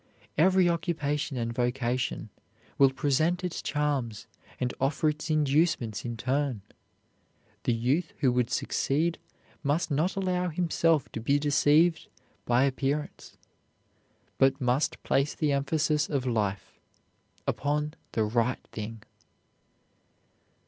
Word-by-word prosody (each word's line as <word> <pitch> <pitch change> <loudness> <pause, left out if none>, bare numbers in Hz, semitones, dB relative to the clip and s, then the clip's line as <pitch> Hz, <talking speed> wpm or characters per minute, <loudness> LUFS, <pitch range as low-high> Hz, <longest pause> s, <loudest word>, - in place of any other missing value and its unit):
Every 185 +3 +4
occupation 150 -5 -1
and 115 -1 -2
vocation 125 +1 -1 0.5
will 135 -1 +7
present 145 +7 +1
its 180 -2 -3
charms 140 -7 -1 0.3
and 125 -1 -1
offer 140 +3 +2
its 150 +2 -4
inducements 150 -7 +1
in 120 -1 -4
turn. 130 -2 -1 1.0
The 120 - +3
youth 135 +9 0
who 130 -4 +3
would 125 -1 +1
succeed 160 +5 0 0.4
must 155 +3 0
not 155 +6 +1
allow 180 -2 0
himself 165 -3 +1
to - - -4
be 140 +5 +2
deceived 150 +3 +3 0.4
by 120 +2 +3
appearance, 140 +2 -2 1.0
but 135 +1 +4
must 125 +2 0
place 140 +2 +1
the 150 -2 +1
emphasis 150 +2 +1
of 140 -4 -1
life 105 -5 -2 0.7
upon 150 +1 -1 0.2
the 110 - +1
right 115 +3 0
thing. 110 0 -6
140 Hz, 115 wpm, -28 LUFS, 125-155 Hz, 1.0 s, will